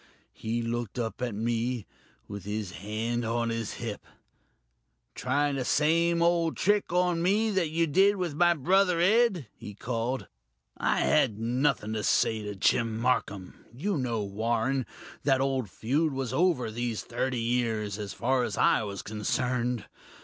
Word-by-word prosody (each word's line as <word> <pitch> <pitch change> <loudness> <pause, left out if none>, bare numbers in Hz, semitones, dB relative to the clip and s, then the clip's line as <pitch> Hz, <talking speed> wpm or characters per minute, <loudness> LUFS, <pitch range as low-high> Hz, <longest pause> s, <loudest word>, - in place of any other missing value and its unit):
He 115 +1 -3
looked 120 -1 -3
up 115 0 -3
at 120 -4 -2
me, 115 +1 -1 0.4
with 100 -2 -7
his 105 -1 -4
hand 110 +4 -3
on 115 +1 0
his 115 -2 -3
hip. 115 -3 -5 1.1
'Trying 145 -1 0
the 130 - -1
same 170 +5 +2
old 170 -1 +2
trick 205 0 +2
on 180 -1 +2
me 210 +5 +2
that 185 -5 +1
you 165 +2 +1
did 195 +7 +4
with 180 -5 -2
my 175 +3 +4
brother 180 +3 +3
Ed?' 195 - +3
he 105 - -9
called. 120 +3 -2 0.5
I - - +1
had 105 - +3
nothing 120 -1 0
to 110 - -2
say 110 +1 +2
to 105 -1 -5
Jim 110 +3 +1
Marcum 105 -6 -1 0.2
you 180 - -2
know, 120 -6 -1
Warren, 115 +6 -1 0.4
that 135 -2 +3
old 135 -5 0
feud 145 - 0
was 130 -2 -3
over 145 -7 +2
these 120 -1 -3
thirty 125 +1 -2
years, 115 -3 -1
as 100 -1 -5
far 130 +2 +1
as 105 - -3
I - - +4
was 100 -2 -5
concerned. 120 +3 -1
125 Hz, 155 wpm, -28 LUFS, 110-160 Hz, 1.1 s, did